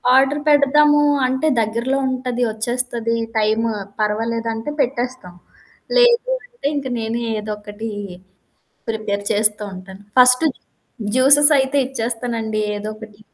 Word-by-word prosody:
Order 275 +2 +3
పెడదాము 295 +1 +5 0.3
అంటే 260 +4 0
దగ్గరలో 235 +5 -1
ఉంటది, 250 -1 -3
ఒచ్చేస్తది, 235 +1 -2 0.2
టైం 215 +1 +2 0.4
పర్వాలేదంటే 225 +3 -2
పెట్టేస్తాం. 245 -6 -3 0.6
లేదు 485 0 +4
అంటే 485 -11 -6
ఇంక 275 -2 -3
నేనే 230 +1 -3 0.2
ఏదోక్కటీ 210 +1 -6 1.0
ప్రిపేర్ 210 -2 -3
చేస్తూ 210 0 +1
ఉంటాను. 190 +1 -11 0.2
ఫస్ట్ 250 +4 +6 0.7
జ్యూసెస్ 285 +3 +6
అయితే 265 +2 0
ఇచ్చేస్తానండి 230 -3 -3
ఏదో 210 +1 -5
ఒకటి. 215 -1 -13
235 Hz, 105 wpm, -19 LUFS, 215-265 Hz, 1.0 s, ఫస్ట్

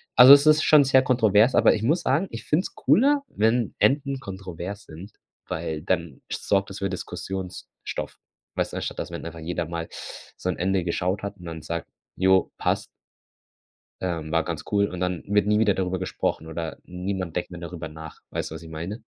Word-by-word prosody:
Also, 125 +2 +11
es 140 +1 +7
ist 155 0 +6
schon 150 -2 +7
sehr 130 0 +5
kontrovers, 115 -1 +4
aber - - +6
ich 105 - -4
muss 160 +9 +2
sagen, 145 +9 +1
ich 115 0 -7
find 160 +5 +2
es - - -8
cooler, 280 +3 +3
wenn 115 0 +1
Enden 140 -1 +2
kontrovers 95 -2 -7
sind, 85 +7 -11 0.3
weil 80 -1 -3
dann 85 -5 -2
sorgt 100 -1 0
es 95 - -7
für 100 - -1
Diskussionsstoff. 95 0 -6 0.4
Weißt - - -1
du, - - -3
anstatt - - -4
dass - - -4
wenn - - -6
einfach 85 0 -7
jeder 85 +1 -3
mal 85 0 -5 0.5
so 90 - -3
'n 90 - -2
Ende 95 +1 +1
geschaut 90 +3 -1
hat 100 0 -5
und 90 - -12
dann 80 -2 -6
sagt: 85 +1 -4 0.3
„Ja, 95 0 +5 0.2
passt” - - 0 1.2
ähm, 85 -4 -3
war 80 0 +2
ganz 85 -2 -4
cool 100 -1 +3
und 90 -2 -6
dann 90 -1 -2
wird 105 0 +2
nie 105 - +4
wieder 105 -3 +3
darüber 95 -1 -1
gesprochen 90 -3 -2
oder 80 -1 -5
niemand 90 -1 -4
denkt 90 - -2
mehr 85 -1 -8
darüber 85 -2 -6
nach. 80 0 -10
Weißt - - -3
du, - - -7
was - - -8
ich 80 - -10
meine? 85 +8 -6
95 Hz, 200 wpm, -25 LUFS, 85-110 Hz, 1.2 s, Also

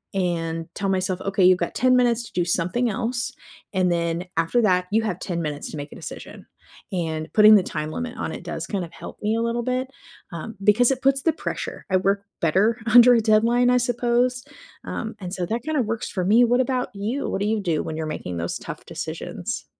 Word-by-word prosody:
and 165 -3 -1
tell 195 -1 -2
myself, 185 -1 0
"Okay, 195 -1 0
you've 185 0 +6
got - - -3
10 255 0 +4
minutes 240 -2 +3
to - - -14
do 175 -1 0
something 180 +8 0
else, 240 +1 -2 0.4
and 185 -2 +2
then 170 0 -1
after 165 +9 +2
that, 180 -4 +2
you 220 +2 +3
have 185 -5 -2
10 170 -3 -3
minutes 150 -2 -4
to - - -6
make 145 0 -7
a - - -10
decision." - - -9 0.5
And 160 -3 -3
putting 215 0 +8
the 195 - +5
time 155 -2 -4
limit 245 +4 -5
on - - -3
it - - -7
does - - -5
kind 190 -4 -2
of 165 - -15
help - - -10
me 215 +2 +1
a 230 - 0
little 235 +1 -1
bit, 255 +1 -1 0.4
um, 170 +7 -7
because 235 +5 +5
it 260 - -2
puts 270 0 +3
the 325 - +3
pressure. - - -5
I 185 - +3
work 200 +1 0 0.2
better 200 +8 +2
under 245 +1 +8
a 230 - +3
deadline, 230 +3 +3
I 250 - +4
suppose, 245 +1 +1 0.4
um, 220 -1 -5
and 180 -1 -6
so 180 - -1
that 230 +5 -2
kinda 310 -2 0
works 225 -1 -3
for 185 - -2
me. 220 +6 +5
What 245 +2 +3
about 255 -1 -1
you? 225 +8 -2
What 195 - -2
do 205 - +1
you 220 0 +1
do 170 -5 0
when 155 - -5
you're 160 - -3
making 90 - -5
those 85 0 -2
tough - - -8
decisions? - - -5
210 Hz, 225 wpm, -23 LUFS, 175-240 Hz, 0.5 s, putting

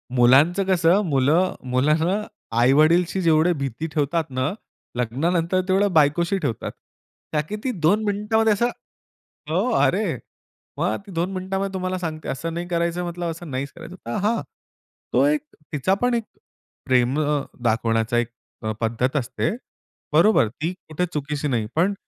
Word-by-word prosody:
मुलांचं 135 +10 +5
कसं 185 +1 +4
मुलं 155 +5 +2 0.2
मुलांना 155 +10 +2 0.4
आई-वडिलशी 155 +9 +4
जेवढी 165 +1 +4
भीती 135 +4 -3
ठेवतात 155 +2 +1
ना, 130 +2 -1 0.4
लग्नानंतर 165 +9 0
तेवढ्या 195 +2 +3
बायकोशी 165 +5 +3
ठेवतात. 140 - -3 0.6
त्या 150 - +1
किती 210 - -4
2 205 +8 +3
मिनिटांमध्ये 210 +2 +2
असं 235 +4 +1 0.8
हो, - - +1
अरे, - - +2 0.6
मग - - 0
ती - - -9
2 175 +2 -1
मिनिटांमध्ये 190 +1 -2
तुम्हाला 185 0 -2
सांगते. 155 -3 -5
असं 165 +5 -3
नाही 175 +1 -4
करायचं 170 0 -1
म्हटलं, 175 -1 -3
असं 165 0 -8
नाहीच 135 +2 -3
करायचं. 180 - -10
तर 120 - -2
हां, 230 +2 +1 0.7
तो - - +4
एक 300 0 +2 0.3
तिचा 150 +7 +1
पण 245 0 +3
एक 235 -1 +1 0.6
प्रेम 130 +2 +2
अ, 150 -1 +1 0.2
दाखवण्याचा 115 0 +1
एक 120 -1 +1 0.4
अ, 110 - -1
पद्धत 120 +5 0
असते. 140 +5 -1 0.6
बरोबर. 215 - +5
ती 155 +10 -4
कुठे 160 +3 -1
चुकीची 150 0 -2
नाही, 120 -6 0
पण 180 +6 +3
165 Hz, 145 wpm, -23 LUFS, 135-185 Hz, 0.8 s, मुलांचं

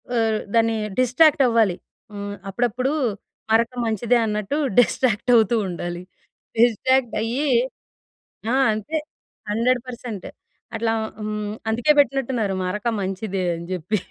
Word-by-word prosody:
ఆహ్, 225 -2 +2 0.2
దాన్ని 225 0 +3 0.2
డిస్ట్రాక్ట్ 280 +4 +4
అవ్వాలి. 225 -6 +3 0.4
హ్మ్. 205 0 -5 0.2
అప్పుడప్పుడు 245 +5 0 0.6
మరక 230 +2 +3
మంచిదే 225 +2 +2
అన్నట్టు 210 +5 -2 0.2
డిస్ట్రాక్ట్ 245 0 +2
అవుతూ 225 +1 +4
ఉండాలి. 175 0 -5 0.6
డిస్ట్రాక్ట్ 245 +2 +3
అయ్యి. 250 +7 -1 1.0
ఆ! - - +1 0.2
అంటే 215 +10 -3 0.5
100% 235 -2 -2 0.5
అట్లా 225 0 0 0.3
హ్మ్, 210 -1 -3 0.2
అందుకే 240 +7 +3
పెట్టినట్టు 270 -1 +2
ఉన్నారు 205 -4 0
మరక 210 +5 -3
మంచిదే 190 0 -3
అని 170 +1 -8
చెప్పి. 180 +5 -1
225 Hz, 110 wpm, -22 LUFS, 210-245 Hz, 1.0 s, డిస్ట్రాక్ట్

